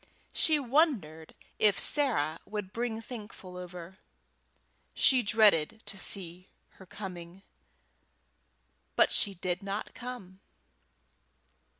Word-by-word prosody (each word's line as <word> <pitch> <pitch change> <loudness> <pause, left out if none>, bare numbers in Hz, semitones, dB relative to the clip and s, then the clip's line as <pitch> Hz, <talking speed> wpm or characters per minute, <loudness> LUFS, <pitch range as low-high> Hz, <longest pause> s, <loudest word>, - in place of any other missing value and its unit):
She 310 -1 +3
wondered 245 - 0 0.2
if 205 -3 +4
Sarah 190 - +1
would 205 -3 -6
bring 230 -1 -3
Thankful 210 -6 -10
over; 180 0 -9 1.0
she 260 -1 +5
dreaded 210 -3 +3
to - - -7
see 185 -1 -1 0.2
her 190 - -17
coming, 185 -1 -9 1.5
but - - +4
she 200 -1 +3
did 180 +1 -3
not 200 +2 -5
come. 240 -7 -9
195 Hz, 95 wpm, -30 LUFS, 180-225 Hz, 1.5 s, she